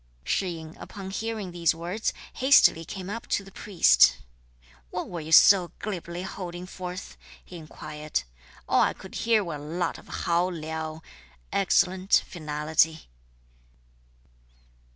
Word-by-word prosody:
Shih 190 - 0
yin 160 0 -10
upon 190 -1 -8
hearing 220 -2 -4
these 170 -1 +1
words, 175 +6 -2 0.2
hastily 260 - +5
came 185 0 -7
up 230 +4 -6
to 200 - 0
the 195 - -14
priest, 65 - +4 0.7
"What - - -4
were 175 - -5
you 155 +1 -8
so 180 +1 +7
glibly 175 -3 -5
holding 180 -2 -6
forth?" 185 0 -7 0.3
he 180 - -10
inquired. 150 - -5 0.4
"All - - +3
I - - +3
could 190 - -13
hear 225 -2 +2
were 170 -5 -5
a - - -10
lot 160 +5 -3
of - - -17 0.2
hao 175 +2 +2
liao 160 -1 -5 0.5
(excellent, 190 0 +3
finality.") 155 - 0
175 Hz, 130 wpm, -26 LUFS, 160-190 Hz, 0.7 s, so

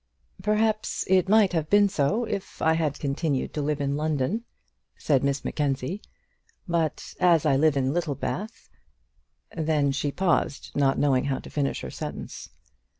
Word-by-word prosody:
"Perhaps 215 +2 0
it 190 0 +3
might 210 -3 +5
have 155 -2 -1
been 205 0 +5
so 195 +7 0
if 205 -3 -5
I 160 - +3
had 155 -3 0
continued 140 -1 -1
to 150 - -2
live 145 0 -1
in 140 0 0
London," 155 - -1 0.5
said 140 -3 +1
Miss 140 0 -1
Mackenzie; 145 +6 -2 0.7
"but 165 -3 -1
as 170 -4 +4
I 145 -3 +4
live 145 +1 +3
at 135 - +2
Littlebath 170 - -3 0.4
" - - -46
Then 155 -3 +1
she 140 +1 -1
paused, 170 -5 0
not 140 -1 +2
knowing 135 -2 +2
how 135 -2 0
to - - -10
finish 140 -2 -1
her - - -6
sentence. - - -7
155 Hz, 155 wpm, -26 LUFS, 140-185 Hz, 0.7 s, might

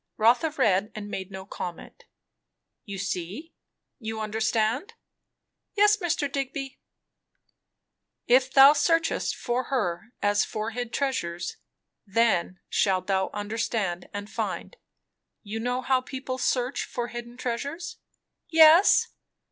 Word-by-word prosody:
Rotha 240 +8 +4
read, 210 -8 +1
and 205 -1 -7
made 190 0 -5
no 190 -1 -8
comment. 180 -3 -8 0.8
"You 200 -1 -6
see? 195 - -4 0.5
You 220 -2 -5
understand?" 220 - -1 0.8
"Yes, 415 0 +5
Mr. 345 -6 0
Digby." 275 0 -4 1.5
"'If 255 +2 +4
thou 275 +2 +9
searchest 330 +2 +1
for 245 +1 -2
her 215 -5 -2
as 205 0 +2
for 215 +1 -4
hid 245 0 -4
treasures, 180 -13 -2 0.5
then 195 -4 +1
shalt 190 -2 +1
thou 190 -1 0
understand, 205 -4 -2
and 205 0 -6
find.' - - -4 0.7
You 215 +1 -5
know 245 +2 -2
how 260 0 +2
people 260 0 -5
search 250 +1 0
for 240 -1 -4
hid 240 0 -8
treasures?" 280 +8 -4 0.5
"Yes." 325 +3 +7
235 Hz, 115 wpm, -26 LUFS, 205-270 Hz, 1.5 s, thou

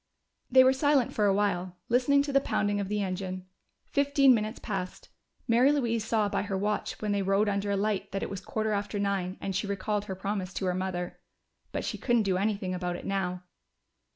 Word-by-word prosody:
They 260 +1 +7
were 260 +1 +5
silent 275 -2 +2
for 210 - +1
a 195 - +4
while, 185 -3 0
listening 260 +4 +3
to 285 -1 -4
the 275 - +6
pounding 205 -5 0
of 200 - -2
the 210 0 -1
engine. 185 -1 -4 0.4
Fifteen 280 -2 +4
minutes 215 0 -1
passed; 190 -4 -5 0.4
Mary 245 +4 +5
Louise 235 -6 0
saw 220 -1 +1
by - - -1
her 200 -1 -2
watch 210 +2 -2
when 210 - 0
they 200 -1 +1
rode 195 +2 +2
under 200 0 -1
a 200 - +1
light 205 0 -1
that 195 - -2
it - - -3
was 195 - -5
quarter 220 0 -2
after 205 0 -2
nine, 195 -2 -1
and 195 -1 -3
she 200 +2 -1
recalled 200 +1 -2
her 190 - -5
promise 190 -1 -3
to 190 - -2
her 180 - +1
mother. 180 -1 -3 0.5
But - - -3
she - - -3
couldn't 240 -3 +2
do 190 -2 +1
anything 200 -2 -1
about 180 -1 -2
it - - -8
now. 180 -2 -2
205 Hz, 210 wpm, -29 LUFS, 190-225 Hz, 0.5 s, They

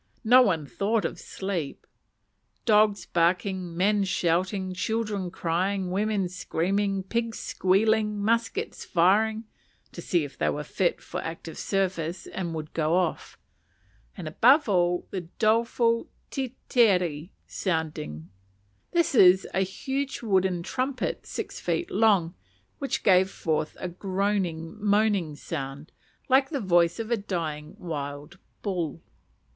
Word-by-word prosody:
No 245 +3 +7
one 165 - +2
thought 205 - 0
of - - -3
sleep. 185 -7 -4 0.8
Dogs 210 -2 +4
barking, 180 0 0
men 205 +2 +3
shouting, 185 +1 0
children 210 -1 -2
crying, 185 +2 -1
women 200 0 0
screaming, 195 +2 -1
pigs 230 +3 -2
squealing, 210 +2 +1
muskets 225 +2 -1
firing 215 +6 +2 0.5
(to 170 - -8
see 170 -1 +1
if 145 - -9
they - - +2
were 150 - -2
fit 175 +3 0
for - - -5
active 165 0 -7
service 185 -3 -2
and 170 -3 -4
would 155 0 -6
go 160 +1 +1
off), 180 -3 -1 0.8
and 175 -5 -6
above 260 - +5
all 175 -3 +2
the 190 - -3 0.2
doleful 230 +1 +2 0.2
tetere 195 - +1 0.2
sounding. 155 - -3 0.7
This 340 -4 +2
was 190 -5 +6
a 190 - +2
huge 265 +9 -3
wooden 190 -4 +1
trumpet 260 +5 -2
six - - -5
feet 350 - -2
long, 195 -5 +3 0.5
which 275 - -2
gave 190 -1 +5
forth 155 -4 -2
a - - -3
groaning, 190 0 -2
moaning 205 -6 +2
sound, 140 -1 -6 0.4
like 265 +1 +4
the 285 - -2
voice 175 -5 +3
of 225 +1 -5
a 235 - +3
dying 160 -7 -4
wild 145 +1 -6 0.2
bull. 170 -6 -3
190 Hz, 125 wpm, -27 LUFS, 170-215 Hz, 0.8 s, No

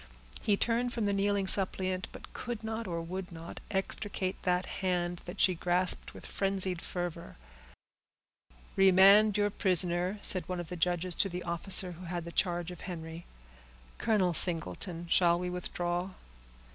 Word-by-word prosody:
He 205 -2 +2
turned 240 +2 0
from 225 -3 -1
the 200 - +1
kneeling 200 0 +1
suppliant, 185 -1 +1
but - - -12
could 240 -3 -5
not, 220 0 -4
or 170 -2 -3
would 180 +2 -6
not, 165 0 -9
extricate 195 -1 -2
that 180 0 0 0.2
hand 175 -2 -1
that 180 +3 -8
she 185 - +5
grasped 180 +1 0
with - - -10
frenzied 190 -3 +1
fervor. 175 -2 -5 1.4
"Remand 195 +2 +6
your 205 0 +1
prisoner," 180 +1 +2
said 185 -3 +3
one 180 -1 -3
of 175 - -6
the 180 - -5
judges 175 +1 0
to 195 - +1
the 180 0 -5
officer 180 +2 -1
who 175 +2 -10
had 175 -1 -4
the 170 - -7
charge 175 0 -1
of 180 - -10
Henry. 165 -2 -7 0.7
"Colonel 195 -6 +2
Singleton, 170 +1 +2
shall 170 0 +4
we 180 0 -3
withdraw?" 175 0 -3
180 Hz, 155 wpm, -31 LUFS, 175-195 Hz, 1.4 s, Remand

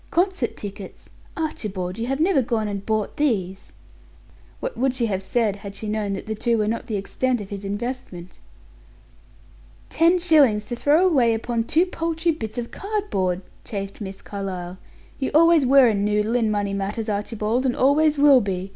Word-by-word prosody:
Concert 355 - 0
tickets! 200 -1 -9 0.3
Archibald, 205 - -4
you 230 - -2
have 270 +2 -1
never 330 -3 +3
gone 225 -3 -1
and 200 -1 -4
bought 215 -2 -1
these!" 195 -10 -1 0.9
What - - -4
would 260 0 0
she 245 -2 0
have 195 -4 -2
said 210 0 0
had 200 0 -9
she 215 - -6
known 210 -1 -2
that 195 - -5
the 220 - -3
two 230 +2 0
were 210 -1 0
not 230 +2 -3
the 220 - -2
extent 245 +5 -1
of 205 -1 -9
his 200 0 -6
investment? 205 -4 -6 1.5
"Ten 335 +2 +4
shillings 290 -12 +4
to 240 - -2
throw 300 +9 +3
away 245 -9 +3
upon 230 0 -2
two 325 +8 +3
paltry 330 -1 -1
bits 220 -7 -6
of 235 -1 -4
cardboard!" 390 - -2 0.2
chafed 200 0 -6
Miss 195 -1 -7
Carlyle. 185 -2 -6 0.4
"You 265 - -1
always 330 -3 +5
were 270 -1 +7
a 225 - +2
noodle 210 +2 0
in 230 -3 +2
money 205 -1 -1
matters, 200 +3 -3
Archibald, 215 +3 -1
and 245 - 0
always 295 +3 +3
will 280 -3 +6
be. 190 -2 -3
225 Hz, 175 wpm, -23 LUFS, 200-275 Hz, 1.5 s, were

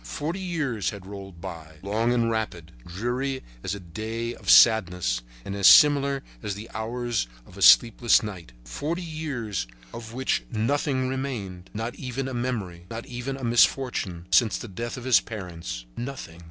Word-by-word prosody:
Forty 150 - -4
years 150 - -1
had 100 -3 -8
rolled 95 -3 -9
by, 80 -2 -8
long 110 +4 +1
and 120 -1 +2
rapid, 90 -7 -3 0.2
dreary 125 +9 -2 0.2
as 95 - -2
a - - -7
day 110 +6 -4
of - - -7
sadness 90 - +5 0.2
and 100 - -4
as 100 -2 +5
similar 140 -2 +6 0.2
as 100 - -3
the 110 +3 -9
hours 115 - -2 0.2
of - - -16
a - - -10
sleepless 120 0 +6
night. 95 - -7
Forty 165 +5 -3
years 135 - -4 0.3
of 115 -1 -8
which 130 +3 0
nothing 130 +3 0
remained, 115 -9 -4
not 115 +3 -4
even 130 0 -4
a 130 - -5
memory, 105 -9 -3
not 115 +1 -6
even 125 +2 -5
a 135 - -9
misfortune, 120 -7 +2
since 115 -4 +4
the - - -7
death 115 +6 -5
of 125 - -7
his 130 -2 +5
parents. 85 - -7
Nothing. 120 -10 -6
115 Hz, 165 wpm, -26 LUFS, 95-130 Hz, 0.3 s, similar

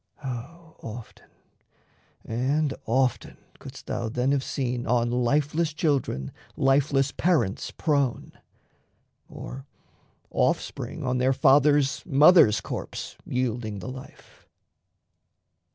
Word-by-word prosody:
O 150 +7 -7
often 115 0 -10 1.0
and 135 +5 0
often 130 +2 0 0.2
couldst - - -11
thou 120 -2 -3
then 125 +4 0
have 140 -1 +1
seen 125 -3 -3
On 120 0 +1
lifeless 145 +6 +1
children 140 - -1 0.3
lifeless 135 0 +2
parents 135 - 0
prone, 140 -6 -1 1.0
Or 135 +2 -9 0.6
offspring - - -1
on 125 -1 0
their 130 +1 +3
fathers', 135 -1 +4
mothers' 145 - +6
corpse - - -6
Yielding 120 -4 -2
the 95 - -7
life. 130 0 -12
130 Hz, 95 wpm, -26 LUFS, 120-145 Hz, 1.0 s, mothers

